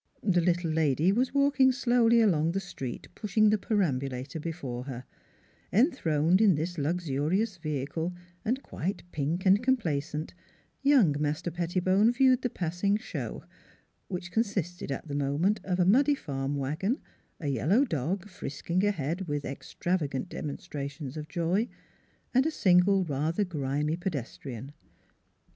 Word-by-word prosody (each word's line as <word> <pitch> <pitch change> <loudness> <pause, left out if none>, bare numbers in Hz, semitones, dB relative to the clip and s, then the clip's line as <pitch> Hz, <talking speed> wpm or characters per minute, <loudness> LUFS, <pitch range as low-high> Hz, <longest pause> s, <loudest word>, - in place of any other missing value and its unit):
The 180 -4 +3
little 175 -1 +1
lady 155 +2 +2
was 250 +5 +1
walking 280 -1 +4
slowly 240 -3 +4
along 165 -6 +3
the 195 - 0
street 135 -10 -6
pushing 215 0 +2
the 215 - +2
perambulator 140 - -1
before 140 -7 -5
her; 130 -3 -6 0.7
enthroned 185 - +3
in 200 -6 +6
this 165 +3 -3
luxurious 170 +6 0
vehicle 155 +2 -3 0.3
and 250 +4 -1
quite 190 +6 -4
pink 155 +6 -2
and 195 +3 +5
complacent, 160 - -1 0.5
young 265 - +5
Master 150 +3 -1
Pettibone 185 +5 +2
viewed 255 0 +4
the 250 - 0
passing 180 +2 0
show, - - -6 0.6
which 175 -1 -5
consisted 180 -7 -1
at 135 - -4
the 145 - -5
moment 145 +9 +1
of 185 -1 -1
a 180 - +4
muddy 275 +9 +5
farm 140 - -3
wagon, 155 - -1 0.4
a 150 - -2
yellow 165 - +3
dog, 175 - -2
frisking 175 0 -3
ahead 180 -2 -1
with 145 -1 -2
ex 135 - -8
travagant 165 -4 -1
demonstrations 140 -2 -6
of 155 -1 -6
joy, 180 +7 0 0.7
and 260 +4 +4
a - - +2
single 190 - +4
rather 155 +6 0
grimy 150 -2 -1
pedestrian. 135 - -5
175 Hz, 135 wpm, -29 LUFS, 145-205 Hz, 0.7 s, in